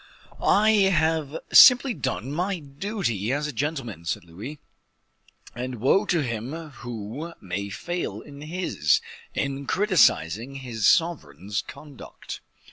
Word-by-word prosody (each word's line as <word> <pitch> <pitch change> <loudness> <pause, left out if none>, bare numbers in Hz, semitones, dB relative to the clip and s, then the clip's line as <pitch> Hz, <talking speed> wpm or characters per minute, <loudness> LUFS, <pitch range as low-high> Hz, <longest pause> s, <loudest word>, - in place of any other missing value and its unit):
"I 215 +2 +4 0.2
have 160 -3 +1 0.2
simply 250 0 +8
done 130 - -3
my 180 +5 -1
duty 140 - -3
as 145 +2 0
a 150 - -4
gentleman," 125 - -3
said 85 - -2
Louis; 100 - -9 1.0
"and 125 +1 -4
woe 140 - +2
to 170 -5 +2
him 120 +2 -4 0.3
who 120 +8 -6
may 100 +2 -4
fail 175 - -4
in 145 -1 -12
his, 150 - +1 0.4
in 140 0 -2
criticising 135 - +2
his 120 -6 -1
sovereign's 100 - +1
conduct." 140 +2 -10
140 Hz, 120 wpm, -25 LUFS, 110-165 Hz, 1.0 s, simply